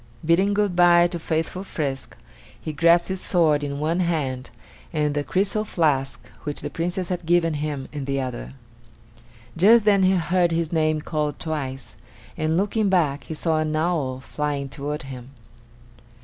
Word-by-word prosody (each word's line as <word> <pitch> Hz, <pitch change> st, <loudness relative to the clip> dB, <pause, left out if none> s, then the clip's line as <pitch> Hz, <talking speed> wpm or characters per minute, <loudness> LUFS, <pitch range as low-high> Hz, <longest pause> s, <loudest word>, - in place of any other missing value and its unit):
Bidding 190 Hz, +5 st, +3 dB
good 205 Hz, -3 st, +1 dB
by 175 Hz, -1 st, +6 dB
to 175 Hz, 0 st, -2 dB
faithful 165 Hz, +3 st, -2 dB
Frisk, 140 Hz, -8 st, -4 dB, 0.4 s
he 155 Hz, -, -5 dB
grasped 170 Hz, +3 st, +4 dB
his 190 Hz, -1 st, -3 dB
sword 155 Hz, -5 st, +2 dB
in 140 Hz, -1 st, -3 dB
one 160 Hz, +4 st, 0 dB
hand 145 Hz, -8 st, -1 dB, 0.4 s
and 150 Hz, -2 st, 0 dB
the 145 Hz, 0 st, -1 dB
crystal 200 Hz, +6 st, 0 dB
flask 150 Hz, -9 st, 0 dB
which 145 Hz, -1 st, -4 dB
the 145 Hz, -, -5 dB
Princess 175 Hz, +3 st, -3 dB
had 180 Hz, -1 st, -3 dB
given 170 Hz, -1 st, +3 dB
him 145 Hz, -2 st, -3 dB
in 145 Hz, -2 st, -4 dB
the 135 Hz, 0 st, -1 dB
other. 95 Hz, -, -5 dB, 1.0 s
Just 210 Hz, +6 st, +5 dB
then 200 Hz, -2 st, +4 dB
he 190 Hz, 0 st, +4 dB
heard 175 Hz, 0 st, +2 dB
his 165 Hz, -1 st, -1 dB
name 155 Hz, -1 st, +1 dB
called 150 Hz, -2 st, -2 dB
twice, 135 Hz, -5 st, -5 dB, 0.4 s
and, 155 Hz, +1 st, 0 dB
looking 205 Hz, +2 st, +1 dB
back, 155 Hz, -7 st, +1 dB
he 160 Hz, -, -6 dB
saw 160 Hz, 0 st, 0 dB
an 155 Hz, 0 st, -1 dB
owl 155 Hz, -6 st, 0 dB
flying 140 Hz, +4 st, -3 dB
toward 145 Hz, +1 st, -4 dB
him. 130 Hz, -2 st, -9 dB
160 Hz, 165 wpm, -23 LUFS, 145-175 Hz, 1.0 s, by